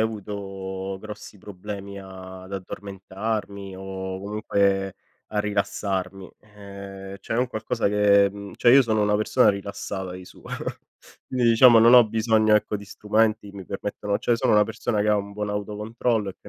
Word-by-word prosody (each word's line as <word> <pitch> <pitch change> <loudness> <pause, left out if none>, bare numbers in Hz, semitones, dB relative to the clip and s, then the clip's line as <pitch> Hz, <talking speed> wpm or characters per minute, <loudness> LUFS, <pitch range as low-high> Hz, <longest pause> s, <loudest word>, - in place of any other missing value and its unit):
avuto 95 -3 -4
grossi 105 -1 -10
problemi 100 +1 -8
ad 95 0 -10
addormentarmi, 100 +1 -5
o 95 0 -5
comunque, 100 -2 0 0.3
a 105 - -3
rilassarmi. 95 -2 -2
Ehm, 100 -2 -10
cioè 110 - -3
è - - +1
un 125 - +2
qualcosa 110 -3 -1
che 100 -1 +5
mhmm, 100 0 -9
cioè 120 - +5
io 135 +1 +8
sono 110 -3 0
una 105 0 +2
persona 110 - +3
rilassata 100 -1 -3
di 90 0 -9
suo. - - -16 0.9
Quindi 125 -2 +2
diciamo 115 0 +8
non 115 +2 +7
ho 120 -2 +8
bisogno, 110 0 +3
ecco, 105 0 +1
di 100 - -10
strumenti, 105 +1 0
mi 100 -2 -9
permettono 100 +1 -3
cioè, 120 - +1
sono - - +1
una 105 -1 +6
persona 110 0 -2
che 105 - +1
ha 105 - +4
un 100 0 -4
buon 105 0 -3
autocontrollo, 105 +2 -2
e - - -15
che - - -14
100 Hz, 165 wpm, -24 LUFS, 95-110 Hz, 0.9 s, io